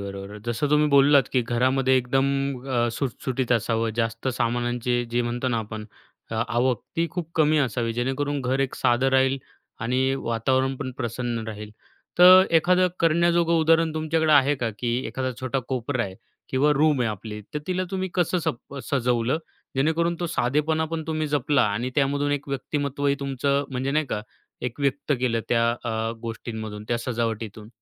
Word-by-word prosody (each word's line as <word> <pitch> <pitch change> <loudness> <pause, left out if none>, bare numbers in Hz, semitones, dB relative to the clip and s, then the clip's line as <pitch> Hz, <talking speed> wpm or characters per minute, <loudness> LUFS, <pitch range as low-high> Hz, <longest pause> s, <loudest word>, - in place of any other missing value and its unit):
बरोबर. 100 +1 -7
जसं 120 +5 -1
तुम्ही 150 0 +4
बोललात, 140 -1 +5
की 125 -2 +3
घरामध्ये 130 +3 +2
एकदम 135 +2 +1 0.4
अ, 120 -2 +1
सुटसुटीत 130 -1 -2
असावं. 115 0 +1
जास्त 115 +2 -1
सामानांचे 120 0 0
जे 120 +1 +1
म्हणतो 120 +2 -2
ना, 115 -2 0
आपण 110 0 -6 0.5
अ, - - -3
आवक 120 -1 +1 0.2
ती 165 0 +2
खूप 175 -3 -5
कमी 155 -1 +3
असावी, 120 -3 0
जेणेकरून 135 +4 -1
घर 130 +2 0
एक 135 - -1
साधं 120 +2 +2
राहील 130 +1 +3 0.4
आणि 130 +3 +1
वातावरण 130 +3 +1
पण 130 - -4
प्रसन्न 120 -1 -3
राहील. 105 -1 -7 0.5
तर 185 +1 +10
एखादं 180 +3 +4
करण्याजोगं 170 +1 +3
उदाहरण 160 0 +3
तुमच्याकडे 160 0 +1
आहे 145 0 +5
का, 120 -3 -2
की 120 -1 0
एखादा 130 -1 -3
छोटा 130 +1 -1
कोपरा 125 -1 -1
आहे 95 -1 -7 0.3
किंवा 140 +3 +2
रूम 150 -1 +3
आहे 120 - +2
आपली, 105 +1 -7
तर - - 0
तिला 185 0 -1
तुम्ही 190 -1 -2
कसं 180 0 +1
सप 155 -5 -4 0.2
सजवलं, 125 0 +1 0.4
जेणेकरून 165 +4 +1
तो 175 - 0
साधेपणा 155 +2 0
पण 160 -1 -2
तुम्ही 155 -1 -1
जपला 145 -2 +2
आणि 120 +5 -2
त्यामधून 145 +1 +1
एक 145 0 -3
व्यक्तिमत्त्वही 140 0 -1
तुमचं, 140 +1 0
म्हणजे 130 +1 -2
नाही 155 +1 +1
का, 105 - -3 0.4
एक 125 +3 -5
व्यक्त 140 +1 0
केलं 115 -3 +1
त्या 115 0 +3
अ, 115 0 -1
गोष्टींमधून, 110 -2 -6
त्या 120 -1 +1
सजावटीतून? 115 -3 -3
130 Hz, 165 wpm, -24 LUFS, 120-145 Hz, 0.5 s, तर